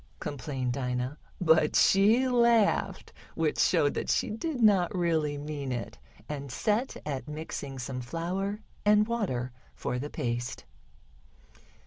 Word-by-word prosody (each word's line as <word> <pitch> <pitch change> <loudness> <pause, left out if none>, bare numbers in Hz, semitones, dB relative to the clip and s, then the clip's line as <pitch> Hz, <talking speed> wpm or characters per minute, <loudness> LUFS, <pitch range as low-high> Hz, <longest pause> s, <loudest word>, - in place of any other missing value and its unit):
complained 130 -3 -3
Dinah, 125 +2 -2 0.2
but 160 -3 +4
she 220 +7 +5
laughed, 235 -4 +2 0.2
which - - 0
showed - - +3
that - - -3
she - - +1
did 265 +6 -3
not 200 -6 +4
really 160 -4 +1
mean 145 -2 -4
it, 120 -2 -5 0.3
and 140 -3 -5
set 215 - 0
at 140 -1 -4
mixing 150 -3 -6
some 125 0 -4
flour 185 - -3 0.2
and 210 0 +4
water 155 - -2 0.2
for 125 - -3
the 145 +3 -4
paste. 120 -2 -3
155 Hz, 125 wpm, -29 LUFS, 130-210 Hz, 0.3 s, she